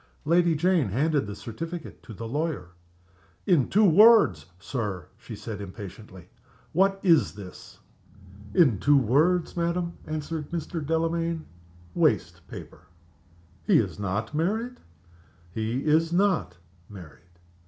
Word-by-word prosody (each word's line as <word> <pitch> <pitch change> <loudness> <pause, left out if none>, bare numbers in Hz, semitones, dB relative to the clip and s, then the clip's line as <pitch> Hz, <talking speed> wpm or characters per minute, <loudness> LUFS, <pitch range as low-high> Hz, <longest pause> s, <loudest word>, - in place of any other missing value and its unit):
Lady 170 +1 +3
Jane 170 - +2
handed 140 - 0
the 100 - -6
certificate 165 +11 -7
to - - -13
the 115 +2 -7
lawyer. 150 - -3 0.8
"In 155 -9 +3
two 210 +2 +4
words, 205 - +6
Sir," 100 - -5
she - - -10
said, 105 -3 -7
impatiently, 95 -2 -10 0.5
"what 195 +3 +2
is 160 - +3
this?" 95 -3 -11 0.8
"In 130 - +4
two 145 +5 +4
words, 155 +9 +2
madam," 170 0 -2
answered 155 0 -4
Mr. 165 -1 -4
Delamayn; 165 +1 -1 0.5
"waste - - 0
paper." 85 +3 -11 0.8
"He - - +4
is - - -1
not 100 +5 -3
married?" 220 +11 -2 0.7
"He 110 +4 -2
is 160 +2 +2
not 175 - +1 0.3
married." 90 -7 -12
155 Hz, 120 wpm, -26 LUFS, 105-170 Hz, 0.8 s, words